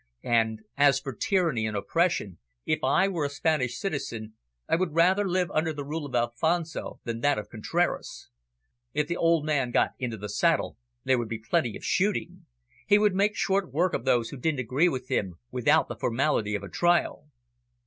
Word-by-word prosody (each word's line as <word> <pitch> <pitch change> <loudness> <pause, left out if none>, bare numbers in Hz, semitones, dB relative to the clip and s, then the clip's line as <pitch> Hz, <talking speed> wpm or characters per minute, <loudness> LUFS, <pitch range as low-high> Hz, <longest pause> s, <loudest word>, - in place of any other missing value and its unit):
And, 110 -2 +1
as 140 -1 +5
for 135 -1 -6
tyranny 155 - 0
and 105 -1 -3
oppression, 135 - 0 0.3
if - - -1
I 145 +9 +3
were 175 -6 -2
a - - -1
Spanish 145 -3 0
citizen, 115 - -4 0.3
I - - +3
would 165 -2 -1
rather 190 +4 +3
live 180 -1 0
under 160 +1 0
the 145 -1 -6
rule 150 +1 -4
of 130 - -6
Alfonso 160 +8 -1
than 115 -1 -4
that 145 +1 +2
of 105 - -5
Contraras. 165 +10 -2 0.7
If 150 0 +2
the 170 - -3
old 165 -2 +2
man 145 -5 +1
got - - +2
into 120 -4 -3
the 105 +1 -6
saddle, 160 - +1 0.3
there 130 -2 +2
would 115 -2 -4
be 115 - -3
plenty 115 +1 -1
of - - -11
shooting. 200 +1 -1 0.4
He 205 - +6
would 210 -2 +3
make 205 +2 +2
short 195 -2 0
work 175 +5 +1
of - - -2
those 120 -3 +2
who 140 - -7
didn't 145 0 -1
agree 135 +9 +2
with 130 -4 -4
him, 95 -4 -1 0.2
without 125 -2 +3
the 120 - -6
formality 115 -2 0
of 100 - -4
a - - -6
trial." 175 - +1
145 Hz, 190 wpm, -27 LUFS, 115-170 Hz, 0.7 s, He